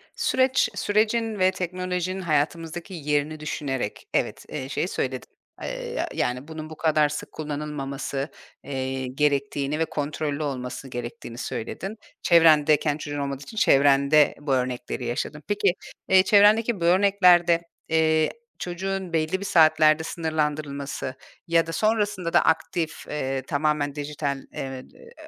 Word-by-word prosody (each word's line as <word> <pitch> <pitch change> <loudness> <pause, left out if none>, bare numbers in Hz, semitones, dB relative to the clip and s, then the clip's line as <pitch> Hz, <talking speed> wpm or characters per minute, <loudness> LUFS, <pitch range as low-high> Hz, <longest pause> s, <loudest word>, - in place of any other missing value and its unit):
Süreç 260 -3 +2
sürecin 215 +1 +1
ve 185 0 +4
teknolojinin 185 0 -3
hayatımızdaki 165 +2 -1
yerini 150 -1 -1
düşünerek, 135 -7 -4
evet, - - -1
eee, 135 -3 -5
şeyi 155 - -1
söyledin. 130 -7 -3 0.3
Iıı, - - -5
ya - - -1
yani 125 +3 -2
bunun 155 -1 -7
bu 155 - -10
kadar 155 -2 +3
sık 150 - -6
kullanılmaması, 145 -2 -4 0.3
eee, 130 -1 -3
gerektiğini 140 +1 0
ve 160 - +2
kontrollü 150 0 -3
olması 130 -1 -4
gerektiğini 120 0 -7
söyledin. 190 - -5 0.2
Çevrendeyken 155 -3 +5
çocuğun 145 -1 -5
olmadığı 140 -1 -3
için 220 - -11
çevrende 140 -2 +5
bu 145 -2 -1
örnekleri 125 -1 -2
yaşadın. 130 +5 -3
Peki, 205 -3 +2 0.4
eee, 190 0 +7
çevrendeki 210 +2 +5
bu - - +1
örneklerde, 180 -2 +5 0.3
eee, 160 -1 +3 0.3
çocuğun 185 0 -4
belli 160 +3 0
bir 200 - -5
saatlerde 155 -2 +5
sınırlandırılması 150 -4 -3 0.3
ya 165 0 +3
da - - -4
sonrasında 205 -1 0
da - - +6
aktif, 160 0 0
eee, 135 -3 -2
tamamen 145 +1 0
dijital, 145 -1 -3 0.2
eee, 135 -1 -5
eee, - - -16
155 Hz, 130 wpm, -25 LUFS, 140-175 Hz, 0.4 s, eee